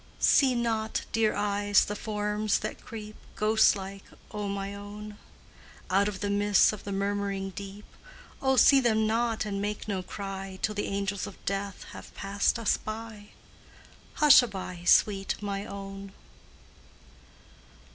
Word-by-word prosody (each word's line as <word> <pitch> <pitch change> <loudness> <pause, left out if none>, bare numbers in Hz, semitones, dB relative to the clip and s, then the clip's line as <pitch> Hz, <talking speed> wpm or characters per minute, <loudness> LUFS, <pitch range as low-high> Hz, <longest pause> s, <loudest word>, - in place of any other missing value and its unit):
See 265 -3 +4
not, 225 -2 -1
dear 220 -1 +2
eyes, 205 0 +2
the 210 - -4
forms 210 0 -1
that 215 - -5
creep 215 -1 -8 0.2
Ghostlike, 200 -2 +2 0.3
O 210 -1 -4
my 200 0 -4
own! 205 +1 -9 0.8
Out 200 +2 +3
of 195 -2 -5
the 205 - -1
mists 205 +1 +4
of 210 - -9
the 200 - -4
murmuring 200 0 -2
deep; 200 +2 -9 0.6
Oh, 265 -1 +2
see 275 +2 +7
them 220 -4 +2
not 225 0 0
and 200 -1 -3
make 210 +1 -3
no 195 -3 -2
cry 195 0 -6
Till 215 - +1
the 205 - -2
angels 200 0 -2
of 205 - -10
death 195 0 -3
have - - -11
passed 200 +3 0
us 230 -2 +1
by 215 -1 -7 0.9
Hushaby, 200 - +4
sweet 195 -1 +3
my 200 0 -4
own! 195 -1 -8
205 Hz, 135 wpm, -28 LUFS, 195-215 Hz, 0.9 s, see